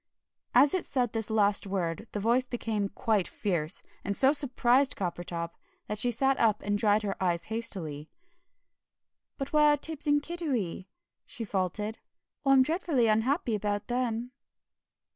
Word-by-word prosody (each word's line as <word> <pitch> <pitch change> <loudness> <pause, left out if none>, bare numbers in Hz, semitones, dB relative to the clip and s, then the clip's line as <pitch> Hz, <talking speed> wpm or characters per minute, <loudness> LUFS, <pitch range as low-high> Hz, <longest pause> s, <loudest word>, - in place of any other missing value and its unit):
As 285 - +6
it 370 - 0
said 250 -4 -1
this 225 -1 -1
last 205 -2 +3
word 190 +1 -3
the 210 - -3
voice 240 +5 +2
became 220 -5 -2
quite 205 -2 0
fierce, 170 -4 -1 0.2
and 200 0 -1
so 270 +2 +5
surprised 265 -2 +2
Coppertop 175 -2 -4 0.3
that 210 0 -3
she 245 - +3
sat 270 +3 +1
up 215 -2 +2
and 205 0 0
dried 210 0 +2
her 200 -1 -2
eyes 170 -2 0
hastily. 165 -10 -3 1.3
"But 275 0 -5
where 300 -1 +5
are - - +1
Tibbs 305 0 -1
and 290 0 +4
Kiddiwee?" 265 - -3 0.4
she 235 - -5
faltered. 210 +2 -2 0.4
"I'm 270 -2 +5
dreadfully 310 -4 +1
unhappy 230 +4 +1
about 205 +1 -2
them." 245 -1 -2
225 Hz, 145 wpm, -29 LUFS, 200-265 Hz, 1.3 s, As